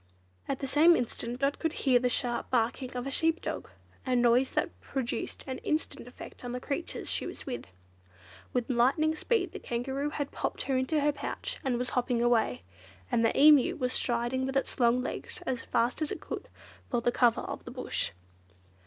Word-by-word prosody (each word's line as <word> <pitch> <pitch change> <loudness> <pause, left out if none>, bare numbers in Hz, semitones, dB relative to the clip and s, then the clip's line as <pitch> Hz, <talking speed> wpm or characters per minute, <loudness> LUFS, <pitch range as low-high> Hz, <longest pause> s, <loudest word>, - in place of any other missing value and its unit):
At 275 - -2
the 270 - -2
same 310 +6 +6
instant 245 0 -3
Dot 275 +1 +1
could 325 -1 0
hear 260 -6 +3
the 250 0 +1
sharp 240 -1 -1
barking 250 +2 0
of 245 - -3
a 275 - -3
sheep 325 +4 +2
dog, - - -4 0.3
a 255 -1 0
noise 245 +2 +4
that - - 0
produced 265 -3 -3
an 260 -1 -4
instant 305 -5 -2
effect 245 - -11
on 245 0 -4
the 250 - -2
creatures 285 +6 -4
she - - -1
was - - -8
with. 250 - -5 0.8
With 245 -2 0
lightning 270 +6 +3
speed 455 +8 0
the - - -7
Kangaroo 265 +4 -2
had 285 -2 -3
popped - - -3
her 270 - 0
into 260 +4 +1
her 295 +1 +3
pouch 290 - -5
and 255 -3 +1
was 250 +1 -1
hopping 245 -1 +1
away, 225 - +2 0.5
and 230 - +3
the 225 - +2
Emu 295 -2 +7
was 250 0 -1
striding 240 +2 0
with 270 0 0
its 270 - -2
long 245 +1 +4
legs - - -5
as 250 -2 -1
fast 235 +6 0
as 305 - 0
it - - -3
could - - -6 0.4
for 240 - +1
the 240 - +2
cover 240 -2 +3
of - - -6
the - - -8
Bush. - - -2
255 Hz, 195 wpm, -30 LUFS, 240-280 Hz, 0.8 s, Emu